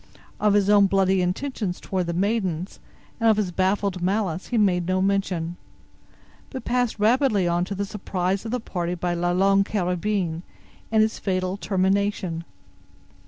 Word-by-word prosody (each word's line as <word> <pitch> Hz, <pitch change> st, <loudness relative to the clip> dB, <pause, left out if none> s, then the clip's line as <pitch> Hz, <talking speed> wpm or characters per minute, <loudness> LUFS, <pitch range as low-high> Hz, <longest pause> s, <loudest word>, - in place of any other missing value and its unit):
Of 210 Hz, -1 st, +3 dB
his 200 Hz, -1 st, +3 dB
own 205 Hz, -1 st, +6 dB
bloody 190 Hz, -1 st, +2 dB
intentions 185 Hz, 0 st, -2 dB
toward 185 Hz, -2 st, -2 dB
the 170 Hz, -, -1 dB
maidens, 190 Hz, -2 st, -1 dB, 0.4 s
and 225 Hz, -1 st, +4 dB
of 215 Hz, -, +4 dB
his 200 Hz, -4 st, 0 dB
baffled 190 Hz, 0 st, 0 dB
malice 185 Hz, -2 st, -1 dB
he 240 Hz, -, -1 dB
made 180 Hz, -5 st, +2 dB
no 185 Hz, 0 st, +1 dB
mention, 185 Hz, -3 st, -1 dB, 0.9 s
but 260 Hz, -, -7 dB
passed 245 Hz, -2 st, 0 dB
rapidly 215 Hz, -3 st, +3 dB
on 175 Hz, +1 st, +1 dB
to 200 Hz, +1 st, -5 dB
the 200 Hz, +1 st, -2 dB
surprise 190 Hz, -2 st, -2 dB
of 225 Hz, -, -5 dB
the 250 Hz, +2 st, -1 dB
party 175 Hz, -5 st, -3 dB
by 175 Hz, 0 st, -2 dB
"La 175 Hz, 0 st, 0 dB
Longue 195 Hz, +2 st, +3 dB
Carabine," 180 Hz, -3 st, -1 dB, 0.5 s
and 220 Hz, -1 st, +5 dB
its 220 Hz, -, -1 dB
fatal 185 Hz, -1 st, -1 dB
termination. 190 Hz, -3 st, 0 dB
195 Hz, 160 wpm, -24 LUFS, 180-210 Hz, 0.9 s, own